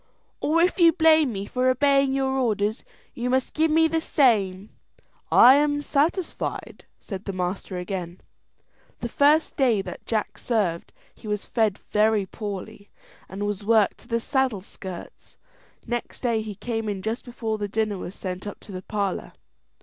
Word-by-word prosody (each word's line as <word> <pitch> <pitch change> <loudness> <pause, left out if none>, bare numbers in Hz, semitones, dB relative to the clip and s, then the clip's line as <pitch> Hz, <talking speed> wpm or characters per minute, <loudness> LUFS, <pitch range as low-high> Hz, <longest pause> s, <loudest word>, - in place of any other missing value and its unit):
"Or 330 +3 +2
if 365 +2 +1
you 335 -1 +7
blame 315 -4 +4
me 195 -2 -4
for 255 +4 +1
obeying 275 +1 +3
your 270 0 0
orders, 220 -5 0 0.3
you 245 +1 -3
must 260 0 0
give 320 +1 +2 0.2
the 325 0 +1
same." 210 - +2 0.6
"I 260 +3 +8
am 290 0 +1
satisfied," 315 +5 -2
said 195 -1 -7
the 195 - -3
master 185 +1 -3
again. 180 -1 -5 0.8
The 235 - -3
first 295 +5 +3
day 245 -6 +3
that 180 - -9
Jack 220 -2 -2
served 195 -8 -1 0.2
he - - -13
was 210 -1 -2
fed 220 -4 +1
very 215 -1 +1
poorly, 205 +1 -7 0.4
and 200 +2 -4
was 205 -1 -3
worked 220 -1 +3
to - - -14
the 230 -1 0
saddleskirts. 210 -8 -4 0.5
Next 240 0 -4
day 230 -3 +1
he 215 -2 -6
came 225 0 -3
in 195 -2 -4
just 225 +3 -3
before 225 -3 -4
the 205 - -2
dinner 210 -1 -1
was 180 - -7
sent 185 +1 -5
up 205 - -7
to - - -12
the 185 -1 -6
parlour. 200 -2 -3
220 Hz, 160 wpm, -25 LUFS, 200-265 Hz, 0.8 s, I